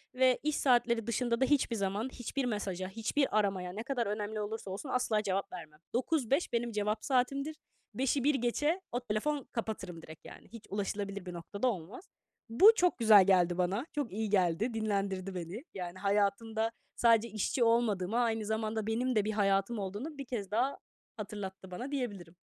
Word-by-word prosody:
ve 255 -1 +4
iş 305 0 +1
saatleri 240 -3 +2
dışında 235 0 0
da - - +6
hiçbir 265 -4 +2
zaman 205 +4 -1
hiçbir 260 +2 -3
mesaja, 195 -5 -2
hiçbir 225 +3 +1
aramaya, 190 -3 -1
ne 215 +3 -5
kadar 240 -3 -1
önemli 210 +1 -3
olursa 210 -2 -5
olsun 205 +9 -6
asla 240 -4 +1
cevap 195 -1 -1
vermem. 155 -4 -9
9-5 265 +3 +1
benim 235 0 0
cevap 210 0 -1
saatimdir. 275 +3 +1 0.4
5'i 265 +1 0
1 290 +1 +3
geçe 295 +8 0
o 245 - -1
telefon 250 +5 -1
kapatırım 190 -7 -4
direkt 160 -1 -13
yani. - - -12
Hiç 230 -2 -11
ulaşılabilir 200 -1 -3
bir 180 - -6
noktada 200 +7 -3
olmaz. 215 - -4 0.4
Bu 375 - +8
çok 360 -4 +2
güzel 215 -4 +8
geldi 180 -2 +4
bana. 190 +8 0
Çok 290 -5 -2
iyi 215 +2 -2
geldi, 195 +4 +2
dinlendirdi 195 -3 -1
beni. 180 - -5
Yani, 180 -1 -6
hayatımda 210 +3 +1 0.2
sadece 230 -1 +4
işçi 220 +3 0
olmadığımı, 230 -3 +2
aynı 225 -2 +1
zamanda 220 0 -2
benim 245 +3 0
de 210 -2 +3
bir 215 - 0
hayatım 200 +1 +1
olduğunu 205 +11 -5
bir 275 - -5
kez 210 -6 -4
daha 250 +6 +1 0.4
hatırlattı 195 -3 -7
bana, 245 +10 -5
diyebilirim. 205 - -4
220 Hz, 170 wpm, -32 LUFS, 195-245 Hz, 0.4 s, Bu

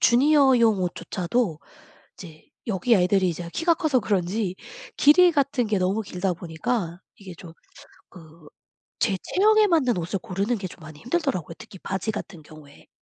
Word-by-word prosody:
주니어용 250 -5 +4
옷조차도 180 +1 -2 0.6
이제 160 -4 -13 0.2
여기 220 +3 +2
애들이 185 0 +2
이제 170 +1 -6
키가 335 +1 +2
커서 310 -7 +1
그런지 195 -1 -1 0.4
길이 350 +5 +6
같은 275 -5 0
게 210 -2 0
너무 190 +4 0
길다 185 -2 -3
보니까 170 +2 -4 0.2
이게 190 -3 -11
좀 165 -3 -12 0.6
그 160 -3 -16 0.5
제 200 -5 +1
체형에 430 +2 +3
맞는 285 - +2
옷을 175 +4 -3
고르는 205 +3 -2
게 190 -2 -5
좀 175 - -14
많이 155 -1 -12
힘들더라고요 245 - -2
특히 190 - -12
바지 190 +4 -4
같은 180 -5 -8
경우에. 150 -1 -16
195 Hz, 325 characters per minute, -24 LUFS, 175-250 Hz, 0.6 s, 길이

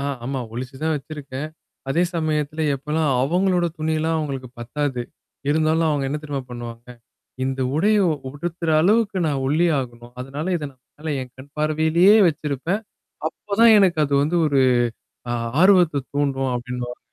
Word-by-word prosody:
ஆ - - -3 0.2
ஆமா. 135 0 -2
ஒளிச்சு 130 +3 -6
தான் 160 0 +1
வச்சிருக்கேன். 145 -1 -6 0.4
அதே 165 +6 +2
சமயத்துல 155 -1 -1
எப்போலாம் 150 +3 -1
அவங்களோட 180 +4 +2
துணிலாம் 160 +1 0
அவங்களுக்கு 135 -4 -4
பத்தாது. 125 +1 -2 0.5
இருந்தாலும் 160 +1 +2
அவங்க 145 -2 0
என்ன 150 +2 -2
தெரியமா 145 -3 -4
பண்ணுவாங்க? 120 0 -8 0.6
இந்த 135 0 -2 0.2
உடைய 210 +6 +3 0.3
உடுத்துற 165 +3 -4
அளவுக்கு 205 +2 +2
நான் 140 -3 -1
ஒல்லியாகணும். 135 -7 0
அதனால 140 +5 -5
இத 155 - -5
நான் 130 -1 -33 0.2
மேல 155 0 -3
என் 125 -1 -11
கண் 140 +2 -13
பார்வையிலேயே 160 +6 +4
வச்சிருப்பேன். 150 +5 -2 0.5
அப்பதான் 210 +6 +3
எனக்கு 180 -5 +3
அது 140 - -3
வந்து 170 +4 +1
ஒரு 140 -2 +3 0.7
ஆ - - 0 0.3
ஆர்வத்த 175 -7 +5
தூண்டும் 135 -2 0
அப்டின்னுவாங்க. 125 0 -5
150 Hz, 140 wpm, -22 LUFS, 135-165 Hz, 0.7 s, ஆர்வத்த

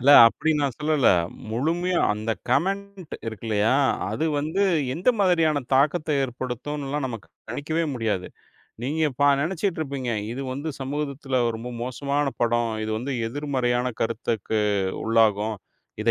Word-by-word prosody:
இல்ல. 140 +4 +5 0.2
அப்டி 160 +7 +1
நான் 140 -4 -1
சொல்லல. 150 -3 +3 0.4
முழுமையா 170 +9 0
அந்தக் 110 -1 -3
கமெண்ட் 195 +5 -1
இருக்கில்லையா? 110 +1 0 0.4
அது 160 - -1
வந்து 160 +7 0 0.3
எந்த 180 - -1
மாதிரியான 165 -6 +3
தாக்கத்த 155 +4 +2
ஏற்படுத்துன்னுலாம், 135 +3 -3
நமக்கு 115 -5 -7 0.2
கணிக்கவே 155 +7 -1
முடியாது. 110 -6 -1 0.6
நீங்க 145 +6 -1
இப்ப 145 +3 0 0.2
நெனச்சுட்டு 175 +3 -1
இருப்பீங்க. 135 -5 -3 0.2
இது 135 +3 -4
வந்து 140 +4 -4
சமூகத்துல 140 -1 -2 0.2
ரொம்ப 120 +2 -6
மோசமான 140 +3 -1
படம். 120 -1 +2
இது 110 - -3
வந்து 135 +4 -3
எதிர்மறையான 125 -2 0
கருத்துக்கு 115 -2 -1 0.4
உள்ளாகும். 110 -1 +2 0.5
இத - - +3
135 Hz, 125 wpm, -25 LUFS, 115-155 Hz, 0.6 s, இல்ல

